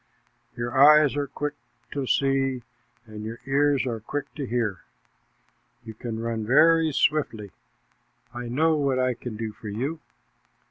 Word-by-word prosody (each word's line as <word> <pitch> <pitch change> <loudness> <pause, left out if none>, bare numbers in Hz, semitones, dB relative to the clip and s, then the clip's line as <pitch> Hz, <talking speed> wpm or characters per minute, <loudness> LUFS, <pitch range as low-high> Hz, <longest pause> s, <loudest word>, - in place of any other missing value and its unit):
Your 120 0 -3
eyes 150 +1 +7
are 145 -1 -1
quick 145 +2 -4 0.4
to 140 -2 -3
see, 135 -2 +1 0.4
and 110 -1 -9
your 115 +2 -6
ears 140 0 +2
are 115 -3 -3
quick 140 +6 -5
to 140 -4 -5
hear. 115 -5 -1 1.1
You 110 - -8
can 110 0 -6
run 115 -1 -2
very 160 +7 +4
swiftly. 125 -9 0 0.8
I 120 0 -6
know 155 +7 +2
what 140 -3 +1
I 130 0 +1
can 120 -2 -7
do 110 -1 -4
for 105 +1 -9
you. 135 +10 -3
130 Hz, 145 wpm, -25 LUFS, 115-145 Hz, 1.1 s, eyes